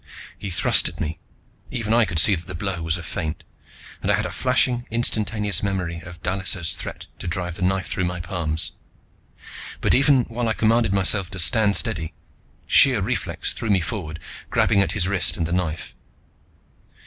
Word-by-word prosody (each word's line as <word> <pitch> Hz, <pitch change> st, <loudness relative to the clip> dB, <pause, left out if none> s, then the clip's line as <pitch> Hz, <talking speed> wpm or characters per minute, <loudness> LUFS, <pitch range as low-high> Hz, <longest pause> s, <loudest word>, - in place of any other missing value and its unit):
He 100 Hz, -, -6 dB
thrust 85 Hz, -, +2 dB
at -, -, -13 dB
me. 80 Hz, +1 st, -4 dB, 0.5 s
Even 115 Hz, -3 st, -1 dB
I 120 Hz, -1 st, +5 dB
could 85 Hz, -, -4 dB
see 100 Hz, -, +7 dB
that 85 Hz, -2 st, -4 dB
the 90 Hz, -, -6 dB
blow 90 Hz, 0 st, -2 dB
was 80 Hz, +1 st, +1 dB
a 85 Hz, -, -8 dB
feint, 80 Hz, -1 st, -4 dB, 0.6 s
and -, -, -2 dB
I -, -, +4 dB
had -, -, -2 dB
a -, -, -4 dB
flashing, 125 Hz, -1 st, +1 dB
instantaneous 105 Hz, -3 st, +1 dB
memory 90 Hz, -4 st, -2 dB
of 85 Hz, +1 st, -12 dB
Dallisa's 95 Hz, -3 st, 0 dB
threat -, -, -7 dB
to -, -, -6 dB
drive 90 Hz, +1 st, -3 dB
the 85 Hz, -, -11 dB
knife 95 Hz, +1 st, +1 dB
through 95 Hz, -, -2 dB
my 90 Hz, 0 st, -3 dB
palms. 85 Hz, -3 st, -2 dB, 1.1 s
But -, -, +2 dB
even 135 Hz, -1 st, +4 dB
while 115 Hz, +1 st, -3 dB
I 110 Hz, -, +2 dB
commanded 115 Hz, 0 st, +2 dB
myself 95 Hz, -1 st, +2 dB
to 95 Hz, -, -7 dB
stand 100 Hz, +3 st, +3 dB
steady, 80 Hz, 0 st, 0 dB, 0.5 s
sheer -, -, +5 dB
reflex -, -, -2 dB
threw 115 Hz, -, -5 dB
me 100 Hz, -2 st, +4 dB
forward, 80 Hz, -4 st, -4 dB, 0.3 s
grabbing 100 Hz, -, +3 dB
at 100 Hz, -, 0 dB
his 95 Hz, -4 st, +1 dB
wrist 95 Hz, -2 st, +1 dB
and 85 Hz, -, -1 dB
the 85 Hz, -, -3 dB
knife. 85 Hz, -3 st, -3 dB
95 Hz, 185 wpm, -22 LUFS, 85-105 Hz, 1.1 s, see